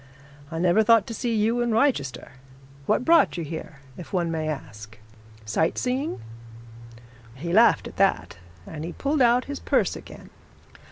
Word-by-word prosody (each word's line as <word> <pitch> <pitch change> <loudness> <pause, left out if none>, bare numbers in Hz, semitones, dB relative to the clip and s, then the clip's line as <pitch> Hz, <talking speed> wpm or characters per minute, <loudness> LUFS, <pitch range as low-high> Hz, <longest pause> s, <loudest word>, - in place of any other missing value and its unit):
'I 165 - -6
never 175 +5 +3
thought 225 -2 +4
to 230 - -7
see 235 0 -2
you 225 +3 +1
in 240 - 0
Wrychester. 220 - 0 0.6
What 250 - +1
brought 335 - +4
you 170 - -3
here, 155 -2 -8 0.2
if 175 - -10
one 175 -3 -1
may 160 -1 -2
ask 110 -7 -7 0.5
sight 160 +9 0
seeing?' 255 - -2 1.2
He 170 +6 -5
laughed 230 +4 +4
at - - -12
that, 195 - +1 0.3
and 155 -1 -8
he 170 +1 -6
pulled 285 0 -1
out 245 +1 +4
his 285 0 -6
purse - - 0
again. - - -12
185 Hz, 160 wpm, -24 LUFS, 155-240 Hz, 1.2 s, thought